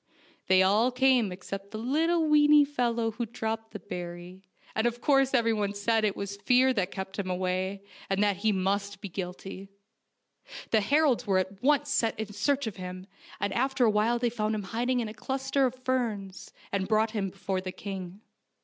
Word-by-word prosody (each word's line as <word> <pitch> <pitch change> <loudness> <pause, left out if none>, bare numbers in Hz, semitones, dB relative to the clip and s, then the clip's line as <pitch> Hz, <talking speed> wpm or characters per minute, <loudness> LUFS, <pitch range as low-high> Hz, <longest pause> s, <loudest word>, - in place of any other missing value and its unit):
They 190 0 +5
all 215 +6 +3
came 250 -5 +3
except 195 +2 -7
the 215 - -6
little 315 +8 +1
weeny 295 -1 +6
fellow 235 -5 0
who 235 +1 -4
dropped 225 -1 -4
the 220 - -7
berry, 175 0 -8 0.3
and 220 +2 +1
of 240 0 -3
course 270 -1 +3
everyone 225 -5 +1
said 225 +3 +1
that - - +1
it 200 - -2
was 200 0 -5
fear 255 +4 +4
that 195 -6 0
kept 190 +1 -6
him 190 -2 -2
away, 185 +2 -2 0.3
and 195 +1 +2
that 205 -2 +2
he 215 +2 +1
must 200 +1 -1
be 200 0 -7
guilty. 190 +1 -6 1.0
The 220 - +4
heralds 270 +1 +2
were 195 -2 +3
at 190 +2 -2
once 290 +2 +2
sent 225 -1 +1
in 215 -1 -5
search 275 +7 0
of 220 -3 -5
him, 185 0 -7 0.3
and 200 - -1
after 265 0 +2
a 220 - +4
while 215 +3 +2
they 240 0 0
found 215 -2 -1
him 210 - -3
hiding 240 +5 -1
in 225 - -3
a 215 - -7
cluster 270 +2 0
of 250 - -5
ferns, 215 -7 -2 0.2
and 195 -1 -1
brought 215 +1 +2
him 205 -3 -2
before 190 0 -3
the 185 0 -5
king. 190 0 -7
215 Hz, 195 wpm, -28 LUFS, 195-245 Hz, 1.0 s, weeny